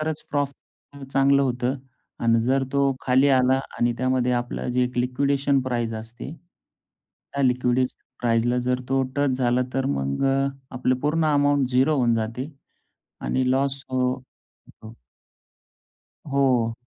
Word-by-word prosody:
तरच 155 0 -3
प्रॉफिट 145 -1 -1 0.4
पण 135 - -8
चांगलं 140 0 +3
होतं 125 +1 -1 0.5
आणि 115 -1 +3
जर 135 +2 +1
तो 140 -1 +2
खाली 130 +2 +3
आला 130 0 +4 0.2
आणि 120 0 +2
त्यामध्ये 130 -1 +1
आपलं 120 0 -2
जे 125 0 +2
एक 125 0 -4
लिक्विडेशन 140 +2 +1
प्राईस 120 -3 -2
असते. 120 +6 -9 1.0
त्या 140 - -1
लिक्विडेशन 125 0 +1 0.2
प्राईसला 120 +1 +1
जर 125 0 0
तो 135 0 +2
टच 145 -1 +2
झाला 125 0 +2
तर 135 - 0
मग 70 - -1
अ, 135 0 +2 0.3
आपलं 130 0 +1
पूर्ण 155 +3 +1
अमाउंट 145 -2 +2
0 135 +4 +3
होऊन 120 -3 +2
जाते 115 +6 -3 0.7
आणि 130 -1 0
लॉस 135 0 0
हो 130 0 +1
होतो. 125 -3 -15 1.4
हो. 125 -5 +2
130 Hz, 140 wpm, -24 LUFS, 125-140 Hz, 1.4 s, आला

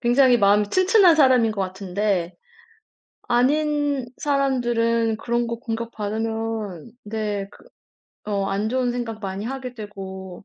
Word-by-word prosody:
굉장히 245 +1 +4
마음이 205 0 +4
튼튼한 370 -2 +5
사람인 255 -6 +4
것 205 - -4
같은데 190 -1 -2 0.9
아닌 285 +2 +1
사람들은 240 -5 +1
그런 235 +1 -1
거 235 0 -3
공격받으면 225 -3 -4
네 210 -2 -3
그 - - -18 0.6
어 200 -2 -1
안 200 +3 -1
좋은 255 -1 0
생각 240 -3 -4
많이 195 0 -4
하게 255 0 -5
되고 190 -4 -8
225 Hz, 255 characters per minute, -23 LUFS, 205-250 Hz, 0.9 s, 튼튼한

